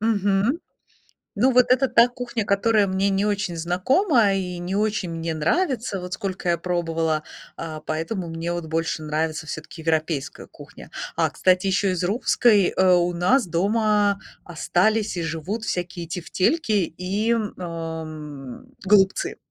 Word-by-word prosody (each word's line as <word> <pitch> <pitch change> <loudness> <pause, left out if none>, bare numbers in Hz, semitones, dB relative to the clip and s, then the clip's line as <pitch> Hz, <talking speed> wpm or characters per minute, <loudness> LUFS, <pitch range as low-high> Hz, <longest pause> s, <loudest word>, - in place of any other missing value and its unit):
Мгм. 210 - +1 0.8
Ну, 260 +1 +3
вот 250 0 +5
это 260 +1 +4
та 235 0 +5
кухня, 245 -2 -4
которая 205 +1 +2
мне 190 +1 +1
не 195 0 +1
очень 205 -4 -1
знакома 205 - +2
и 180 -2 -3
не 175 +2 -4
очень 210 -3 0
мне 165 0 -3
нравится, 230 - 0
вот 180 0 -8
сколько 190 -1 -4
я 170 - +1
пробовала, 165 -3 -1 0.3
а, 155 -2 -6
поэтому 170 +4 -3
мне 165 +1 -3
вот 175 -1 -4
больше 160 0 -2
нравится 155 +1 -2
всё-таки 160 +2 -7
европейская 160 -3 -2
кухня. - - -13 0.3
А, - - +2
кстати, 185 +1 +2
еще 190 0 +1
из 180 - -2
русской, 210 0 +3
э, 185 -1 +5
у 175 0 +2
нас 195 +8 +2
дома 205 +3 +2 0.3
остались 195 +5 0
и 170 - -2
живут 165 +7 -4
всякие 175 -4 -4
тефтельки 195 - 0
и, 195 +3 0
м, 225 -3 0
ам, 155 -5 -7 0.2
голубцы. 195 -1 +3
185 Hz, 145 wpm, -23 LUFS, 165-210 Hz, 0.8 s, вот